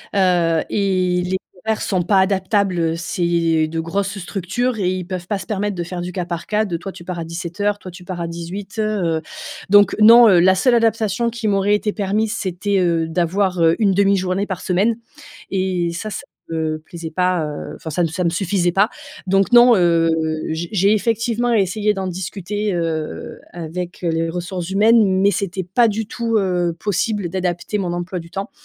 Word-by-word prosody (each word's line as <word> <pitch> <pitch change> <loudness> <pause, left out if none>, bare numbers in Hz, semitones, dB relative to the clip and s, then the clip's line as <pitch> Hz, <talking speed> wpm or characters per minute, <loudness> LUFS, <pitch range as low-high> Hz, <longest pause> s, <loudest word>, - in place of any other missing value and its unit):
heu, 175 -4 +3
et 185 -3 +1
les 185 +1 0 0.3
horaires 220 -1 0
sont 185 -3 0
pas 195 +2 +3
adaptables. 190 -1 +1
Heu, 165 -1 +1
c'est 165 -2 0
de 165 +1 -4
grosses 195 +4 -2
structures 205 +6 -2
et 180 - 0
ils 185 -1 -3
peuvent 180 -1 -6
pas 205 -2 -1
se 185 - -8
permettre 205 -1 -2
de 175 - -3
faire 175 +1 -6
du 180 +1 -5
cas 180 -1 -2
par 170 -1 -5
cas, 215 0 +1
de: 175 -6 -3
«Toi, 195 +2 -7
tu 170 - -11
pars 175 -1 -5
à 165 - -4
17:00, 180 +5 -3
toi, 185 - -9
tu 180 +1 -13
pars 175 -2 -5
à 170 - -2
18:00», 195 +4 -3
heu, 160 -1 0 0.5
donc 205 +1 +6
non, 230 +1 +8
heu, 180 -3 +6
la 190 +2 +5
seule 245 +6 +3
adaptation 225 0 +1
qui 230 -2 -2
m'aurait 200 +1 +2
été 210 0 -1
permise, 210 +2 -1
c'était, 190 +2 -1
heu, 165 -2 +1
d'avoir, 180 +2 0
heu, 165 0 +4
une 205 -3 +3
1/2 200 +1 +3
journée 190 +2 -1
par 190 -3 -4
semaine 200 +5 +1 0.6
et 185 -3 0
ça, 195 +6 -5
ça 195 - -6 0.3
me 160 -1 -1
plaisait 165 +1 -8
pas, 180 -1 0
heu, 150 -1 -6
enfin, 160 - -8
ça 175 +4 0
me 165 - +2
ça 170 +3 -3
me 170 - +2
suffisait 175 0 0
pas. 200 +5 +3 0.4
Donc 195 +3 +2
non, 240 0 +7
heu, 170 -3 +3 0.4
j'ai 165 +2 -3
j'ai 200 +1 +3
effectivement 230 +2 0
essayé 210 0 +1
d'en 190 -1 -3
discuter, 195 +3 -3
heu, 160 -2 -3
avec, 175 +2 -6
heu, 170 - +1
les 165 0 0
ressources 175 0 -4
humaines, 200 -1 +4
mais 200 - +4
c'était 190 0 -2
pas 225 +7 +3
du 220 +1 -2
tout, 230 0 -1
heu, 180 -3 0
possible 205 -2 -1
d'adapter 185 +3 -2
mon 175 -2 -2
emploi 175 +1 -4
du 170 0 -11
temps. 195 +2 -5
185 Hz, 200 wpm, -20 LUFS, 175-205 Hz, 0.6 s, non